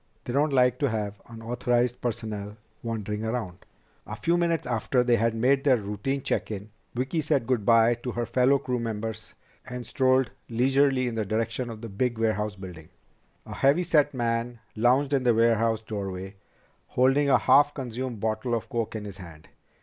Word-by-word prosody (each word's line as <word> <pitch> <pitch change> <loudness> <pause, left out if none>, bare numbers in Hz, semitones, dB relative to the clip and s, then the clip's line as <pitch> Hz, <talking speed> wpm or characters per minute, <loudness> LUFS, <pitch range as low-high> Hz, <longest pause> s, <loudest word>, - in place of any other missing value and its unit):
They 120 - -4
don't 145 +2 +2
like 125 -2 +3
to 140 - +1
have 105 -2 -4
unauthorized 120 +1 -1
personnel 110 -3 -4 0.2
wandering 110 -2 -4
around." 110 -6 -3 0.5
A - - -5
few 170 - +1
minutes 170 -1 0
after 125 +1 +1
they 120 -1 +3
had 115 +1 +1
made 130 +4 +2
their 135 -3 +4
routine 115 +6 -3
check - - -1
in, 105 0 -6 0.2
Vicki 130 +7 -1
said 145 -5 0
good 120 -5 -1
by 115 0 +6
to 120 +1 -6
her 120 0 -2
fellow 130 +4 +3
crew 125 -2 -3
members 110 -1 -5 0.3
and 125 -1 -7
strolled 130 -2 +2 0.2
leisurely 130 +2 +2
in 120 - -3
the 110 -1 -1
direction 115 +4 -2
of 110 -2 -8
the 115 - -6
big 120 +4 -1
warehouse 105 -2 0
building. 90 -5 -10 0.6
A - - -8
heavy 140 +6 +3
set 150 -4 +3
man 120 -1 -2 0.2
lounged 130 +5 +2
in 135 - +3
the 120 -2 +3
warehouse 115 -1 +2
doorway, 95 -3 -5 0.5
holding 135 +3 +2
a - - +6
half 145 +1 +4
consumed 125 -3 -5
bottle 110 +3 -1
of 115 -1 -5
coke 115 -1 -2
in 105 -1 -5
his 100 -2 -8
hand. 85 -5 -12
120 Hz, 180 wpm, -26 LUFS, 110-130 Hz, 0.6 s, by